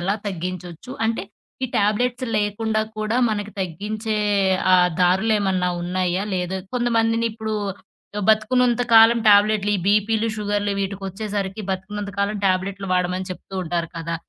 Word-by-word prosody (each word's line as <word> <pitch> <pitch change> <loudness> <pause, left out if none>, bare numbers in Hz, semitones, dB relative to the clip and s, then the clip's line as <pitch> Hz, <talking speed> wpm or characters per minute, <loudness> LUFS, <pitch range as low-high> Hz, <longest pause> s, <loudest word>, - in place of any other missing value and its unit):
ఎలా 190 +3 0
తగ్గించొచ్చు, 180 +3 -6
అంటే 225 -4 -1 0.4
ఈ - - 0
టాబ్లెట్స్ 245 +5 +1
లేకుండా 215 +1 0 0.2
కూడా 215 +2 -1
మనకు 205 -1 -3
తగ్గించే 210 +5 -3 0.6
ఆహ్, 180 -1 +5
దారులేమన్నా 190 0 +2
ఉన్నాయా, 180 +1 -1
లేదా 180 +1 -2 0.2
కొంతమందినిప్పుడు 225 -2 0 0.6
ఆహ్, 205 - -2
బతుకున్నంత 240 +3 +2
కాలం 225 +1 +8
ట్యాబ్లెట్‌లు 205 0 +4
ఈ - - -3
బీపీలు, 215 +2 +2
షుగర్‌‌లు 205 -1 -1
వీటికొచ్చేసరికి 195 +1 -4
బతుకున్నంత 200 +2 -5
కాలం 205 +1 0
ట్యాబ్లెట్‌లు 195 +1 -1
వాడమని 180 +1 -1
చెప్తూ 195 - -12
ఉంటారు 170 0 -2
కదా! 165 0 -3
205 Hz, 120 wpm, -22 LUFS, 185-220 Hz, 0.6 s, కాలం